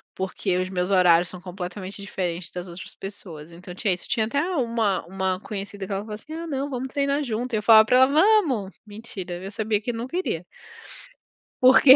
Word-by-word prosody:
porque 190 0 -1
os 185 0 -1
meus 180 +1 -1
horários 175 -2 +5
são 185 -1 -8
completamente 185 +2 -6
diferentes 180 -3 -3
das 180 0 -6
outras 175 +1 -9
pessoas, 170 -5 -8
então, 180 +1 -10
tinha 195 0 +1
isso, 175 - -6
tinha 220 -1 +1
até 280 +5 0 0.2
uma 230 -6 0
uma 190 0 -1
conhecida 200 -2 -5
que 200 - -9
ela 195 0 -1
falou 215 0 -8
assim: 300 +9 -9
"Ah, 335 +1 -5
não, 280 -1 -2
vamos 260 0 -3
treinar 280 +1 0
junto" 240 0 -3
e - - +3
eu 210 - -3
falava 220 -1 +8
pra 250 +3 +4
ela: 260 0 +8
"Vamos." 300 - +3
Mentira, 205 -4 -6
viu, 190 - -8
eu 195 - -5
sabia 215 0 0
que 245 - -2
nunca 240 +8 -5
iria. 175 - -2 1.2
Por 255 +1 +8
quê? 265 -1 +10
205 Hz, 210 wpm, -24 LUFS, 185-245 Hz, 1.2 s, quê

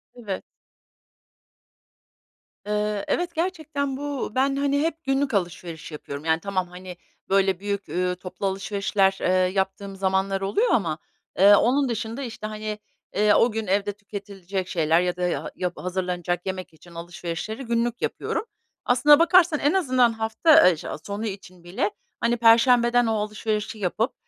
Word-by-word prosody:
Evet. 210 -6 -5 2.2
Eee, 210 0 -1
evet, 345 -1 -1
gerçekten 315 -6 -2
bu, 285 -5 -4
ben, 270 +1 +2
hani, 280 0 +1
hep 325 0 -2
günlük 270 -1 0
alışveriş 175 -4 -3
yapıyorum. 145 -1 -7
Yani, 160 0 +2
tamam, 185 0 -2
hani, 180 0 -10 0.3
böyle, 195 -1 +2
büyük, 200 0 -3
eee, 180 0 -1
toplu 180 +2 -7
alışverişler, 195 0 0
eee, - - +1
yaptığım 190 +2 0
zamanlar 195 0 0
oluyor 410 - +1
ama, 165 -8 +1 0.4
eee, 200 +2 +8
onun 265 +5 +2
dışında, 230 +3 -4
işte, 220 -3 -6
hani, 215 0 -5 0.4
eee, 210 0 +4
o 235 - +4
gün 220 -2 -4
evde 200 +2 +1
tüketilecek 195 -2 -6
şeyler 165 -1 +2
ya 180 0 -1
da 180 - -7
ya 175 - -3
yap 180 -1 -2
hazırlanacak 180 -1 -3
yemek 185 -3 -5
için 170 +2 -17
alışverişleri 175 +7 -5
günlük 235 0 -1
yapıyorum. 440 - -2 0.4
Aslına 290 +5 +6
bakarsan 340 -2 +5
en 290 +4 +2
azından 255 -10 +3
hafta, 225 - +5
eee, 170 - 0
şe - - -8 0.2
sonu 205 +2 -4
için 190 -4 -8
bile, 195 +4 -2 0.3
hani, 240 +1 +1
perşembeden 235 +1 +5
o 225 - +1
alışverişi 215 +1 -2
yapıp 210 +5 -1
205 Hz, 150 wpm, -24 LUFS, 185-245 Hz, 2.2 s, eee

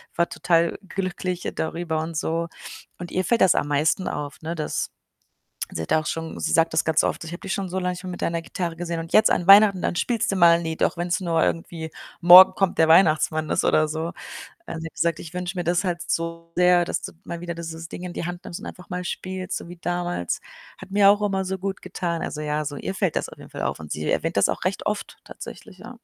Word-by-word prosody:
war 170 - +1
total 170 -1 +1
glücklich 185 -2 -3
darüber 160 0 -2
und 160 0 -5
so. 165 +1 -1 0.5
Und 175 0 -6
ihr 185 - 0
fällt 235 +4 +2
das 185 - +6
am - - 0
meisten 155 +6 +1
auf, 145 -1 -5
ne, 165 +1 -4
dass 155 - -3 0.8
sie 80 - -4
hat - - -1
auch 155 -1 +2
schon 165 +1 -4
sie - - -1
sagt 165 0 +3
das 160 - +2
ganz 160 -1 +3
oft: - - -2
„Ich 165 - -8
habe 175 - -6
dich 190 - -3
schon 195 -2 -3
so 190 +1 -2
lange 180 0 -1
nicht 180 +1 -9
mehr 185 - -5
mit 175 - -7
deiner 170 0 -1
Gitarre 170 0 -4
gesehen 170 0 -4
und 165 0 -7
jetzt 215 0 +6
an 175 - +1
Weihnachten, 200 -2 +8
dann - - -1
spielst 230 +4 0
du - - -1
mal 170 -2 +7
’n 170 - -5
Lied, 160 -1 -2
auch - - +1
wenn’s 175 +1 -1
nur 170 -3 +1
irgendwie 165 -1 -2 0.3
„Morgen 180 +2 +10
kommt 195 -2 0
der 160 - +5
Weihnachtsmann“ 155 -2 +4
ist - - +1
oder 155 0 +3
so.“ 160 +2 -3 0.6
Also, 165 - -6
sie 165 - -5
hat - - -26
gesagt: 170 -1 0
„Ich 165 +1 -10
wünsche 180 0 -4
mir 175 - -1
das 175 +2 +1
halt 175 -2 -1
so 165 0 -3
sehr, 180 0 +5
dass - - -3
du - - -6
mal 170 - -6
wieder 170 -1 -5
dieses 165 0 -7
Ding 180 - -8
in 180 - -5
die - - -4
Hand 175 0 -6
nimmst 170 - -7
und - - -9
einfach 180 -1 -10
mal 180 0 -3
spielst, 185 +1 -4
so - - -11
wie 175 - -9
damals. 175 - -2 0.4
Hat - - -11
mir 200 0 +6
auch 205 +1 +3
immer 195 -2 0
so 190 +1 -3
gut 195 +1 -4
getan.” 175 -2 -3
Also 150 - -4
ja, 150 0 -1
so, 145 0 -5
ihr 190 - -4
fällt 190 -4 -1
das - - -1
auf - - -12
jeden - - -13
Fall - - -6
auf - - -2
und 80 -1 -9
sie 75 0 -3
erwähnt - - -1
das - - +4
auch - - -3
recht - - -2
oft - - -3
tatsächlich, - - -10
ja. - - -10
170 Hz, 255 wpm, -24 LUFS, 165-180 Hz, 0.8 s, Morgen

